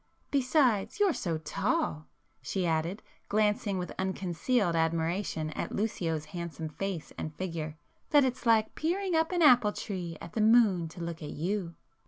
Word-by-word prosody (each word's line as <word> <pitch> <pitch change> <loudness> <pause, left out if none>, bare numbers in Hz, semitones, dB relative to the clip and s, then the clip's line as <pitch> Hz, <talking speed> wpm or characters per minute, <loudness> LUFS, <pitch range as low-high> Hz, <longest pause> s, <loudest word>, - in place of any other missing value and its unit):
Besides 255 - +2
you're 400 -4 +4
so 170 - -2
tall," 160 - -1 0.3
she 190 -2 -2
added, 165 +5 -1 0.3
glancing 210 -1 +1
with 180 -1 -4
unconcealed 190 +1 0
admiration 165 0 0
at - - -4
Lucio's 165 -7 -1
handsome 170 -2 -5
face 185 0 -4
and 155 -1 -5
figure, 165 -4 -4 0.3
"that 290 -2 +6
it's 250 -1 -2
like 220 -1 +4
peering 365 +4 -1
up 320 +1 +2
an 350 -2 +2
apple 245 -7 +6
tree 175 -5 -5
at 165 - -10
the 220 - 0
moon 215 -6 +5
to 170 +2 -10
look 170 -1 -5
at 150 - -6
you!" 175 +1 -3
190 Hz, 155 wpm, -30 LUFS, 165-230 Hz, 0.3 s, that